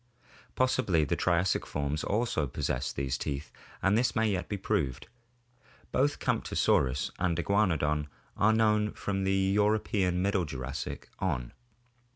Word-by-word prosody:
Possibly 125 -11 +2
the - - 0
Triassic 85 0 +1
forms 75 +1 -2
also 105 -9 0
possessed 65 +1 -2
these 65 -2 -2
teeth 70 +1 -4 0.3
and 95 +1 +4
this 120 +2 +2
may 110 0 +2
yet 90 -3 -2
be 100 - -2
proved. 85 - -1 0.9
Both 145 +3 +2
Camptosaurus 65 0 +1
and 90 -2 +1
Iguanodon 80 -6 +1 0.3
are 105 +2 +4
known 105 -1 +2
from 95 -1 -2
the 95 0 +2
European 100 -2 +2
Middle 100 -2 +1
Jurassic 65 -1 -5
on. - - -2
95 Hz, 130 wpm, -30 LUFS, 75-105 Hz, 0.9 s, and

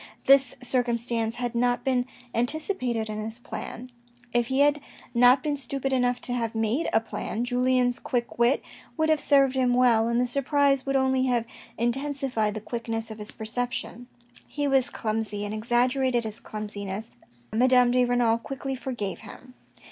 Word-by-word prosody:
This 275 -1 +5
circumstance 235 -2 0
had 245 -1 -3
not 245 +1 +1
been 255 -2 +1 0.3
anticipated 245 - -1
in 215 0 -5
his 220 +1 -4
plan. 245 0 -8 0.4
If 240 -1 +2
he 265 +2 +1
had 290 0 +3 0.3
not 245 +3 +5
been 300 -2 0
stupid 275 0 -3
enough 250 -1 +1
to 245 - -2
have 230 -2 -2
made 225 +7 0
a 225 - +4
plan, 225 0 -4
Julien's 250 0 +1
quick 240 -1 -3
wit 240 +4 +3 0.3
would 315 0 +1
have 310 -1 +3
served 275 -2 +4
him 250 -2 +2
well, 235 -3 +4
and 235 0 +1
the 250 - +2
surprise 275 +1 +1
would 275 - 0
only 265 -1 +2
have 240 -2 +1 0.3
intensified 245 -3 -1
the 215 - -4
quickness 225 0 -4
of 215 - -8
his 210 - -5
perception. 240 +1 -4 0.4
He 290 -1 -2
was 270 -1 +3
clumsy, 215 -4 -3
and 205 - -4
exaggerated 245 +2 +1
his 220 0 -5
clumsiness, 210 0 -6 0.4
Madame 250 +1 +5
de 250 0 +3
Renal 240 -2 +2
quickly 270 +2 -5
forgave 245 -7 -4
him. 250 +4 -13
245 Hz, 165 wpm, -26 LUFS, 230-265 Hz, 0.4 s, This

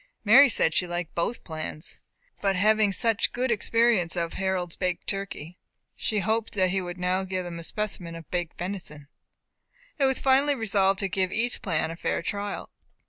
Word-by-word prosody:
Mary 270 +7 +8
said 165 -7 +2
she 180 - +2
liked 175 -1 -4
both 170 +8 -2
plans, 155 -1 -6 0.4
but 195 -1 +2
having 215 +2 +4
had 195 - -2
such 230 -2 +2
good 250 +1 -1
experience 225 -5 +2
of 170 -1 -2
Harold's 185 -3 -2
baked 180 -2 -2
turkey, 185 -4 -5 0.4
she 210 -2 -1
hoped 220 +3 -1
he 190 -1 +2
would 175 0 -6
now 180 +1 0
give 185 -1 -3
them 170 -1 -6
a - - -8
specimen 180 -3 -4
of 165 -2 -10
baked 175 -3 -2
venison. 175 -6 -5 0.9
It 275 - +4
was 265 -1 +2
finally 275 +2 +3
resolved 195 -4 +2
to 195 - +1
give 190 -1 0
each 240 +4 -1
plan 165 -7 0
a - - -6
fair 170 - -2
trial. 205 +2 -4
190 Hz, 180 wpm, -26 LUFS, 175-215 Hz, 0.9 s, Mary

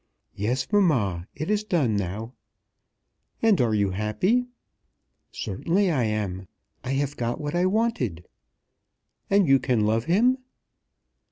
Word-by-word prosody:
"Yes, 125 +6 -1
mamma, 110 - +2
it 155 +7 -3
is 210 0 +1
done 155 - +1
now." 100 +5 -4 1.1
"And 215 - +4
are 115 -3 +2
you 100 -2 +1
happy?" 180 - 0 0.8
"Certainly 175 - 0
I 130 -7 +1
am. 100 -4 -3 0.4
I 130 - -2
have 140 +1 -1
got 120 +2 -2
what 145 -1 -4
I 175 +1 +2
wanted." 185 - -1 1.0
"And 195 -3 +4
you 135 0 +5
can 125 -3 +1
love 110 +2 +1
him?" 240 +9 +3
130 Hz, 125 wpm, -25 LUFS, -, 1.1 s, you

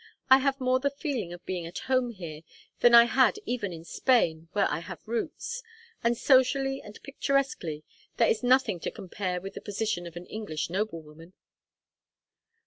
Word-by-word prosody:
I 265 - +10
have 275 0 0
more 255 0 +2
the 280 +2 +1
feeling 275 - -4
of 175 0 -10
being 175 -3 -3
at 170 - -8
home 255 -2 +2
here 170 -8 -8 0.4
than 240 -1 +7
I 235 - +11
had 255 - +3
even 225 - -2
in 165 -1 -9
Spain, 165 -9 +1
where 205 -1 +3
I - - -2
have 170 - -10
roots. 355 - -3 0.4
And 235 0 +2
socially 270 +1 +3
and 210 0 -11
picturesquely, 275 - -1 0.3
there 230 - +4
is 220 - +1
nothing 250 -7 +3
to - - -3
compare 185 -1 -4
with 195 +2 -8
the - - -8
position 205 -4 -2
of 170 - -11
an 175 +1 -7
English 170 -8 -4
noblewoman." 165 -4 -5
220 Hz, 170 wpm, -28 LUFS, 175-260 Hz, 0.4 s, I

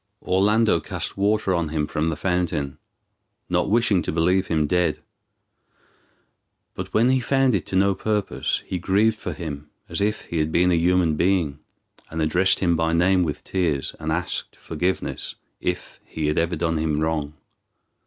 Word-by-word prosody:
Orlando 105 +4 +3
cast - - -4
water 100 0 +1
on 85 -3 0
him 75 -1 -1
from 80 +1 -1
the 80 - -2
fountain, 85 -7 -1 0.7
not - - +1
wishing 110 -4 +3
to - - -3
believe 90 +4 +2
him 80 -2 +1
dead; 85 0 +1 1.7
but - - -6
when 115 +3 +3
he 130 0 +3
found 135 +1 +2
it 95 -6 -1
to - - -4
no 100 +1 +4
purpose, 105 +1 -1
he 90 - -3
grieved 105 +5 +2
for - - -4
him 75 -4 -7 0.2
as - - -3
if 105 +1 0
he 85 - -4
had 75 0 0
been 90 +2 +3
a - - +4
human 85 -2 +2
being, 85 -6 +1 0.5
and 80 - -5
addressed 90 +4 +2
him 85 -3 +3
by 80 0 +1
name 90 +2 +3
with 80 -4 -2
tears, 80 -7 -1
and 80 0 -3
asked 90 +2 -2
forgiveness 90 +4 -3 0.2
if - - -4
he 80 - -4
had 75 +1 +1
ever 85 +1 0
done 80 0 0
him 80 -1 0
wrong. 75 -2 -1
90 Hz, 170 wpm, -23 LUFS, 80-95 Hz, 1.7 s, no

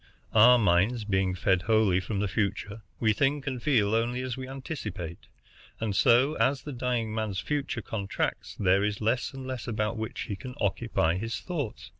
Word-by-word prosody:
Our 120 +3 +8
minds 105 +3 +2
being 95 -2 0
fed 95 0 +2
wholly 110 -3 +3
from 100 +2 -3
the 105 - +1
future, 100 +2 -2 0.2
we 110 -2 +3
think 145 +4 +1
and 130 -3 -3
feel 110 -8 +2
only 120 +3 0
as 130 -2 -3
we 130 -1 -6
anticipate; 105 - -6 0.5
and 110 -3 -2
so, 125 +7 +4
as 135 0 +2
the 145 - -6
dying 120 -3 -1
man's 110 -3 -2
future 140 -6 -2
contracts, 100 -3 -3
there 95 0 +3
is 105 -1 -1
less 115 +1 0
and 135 -1 -8
less 130 -2 -5
about 110 0 -1
which 110 0 -4
he 100 - -4
can 125 +6 -9
occupy 95 -4 +1
his 115 +4 -3
thoughts. 150 - -5
110 Hz, 180 wpm, -28 LUFS, 100-125 Hz, 0.5 s, Our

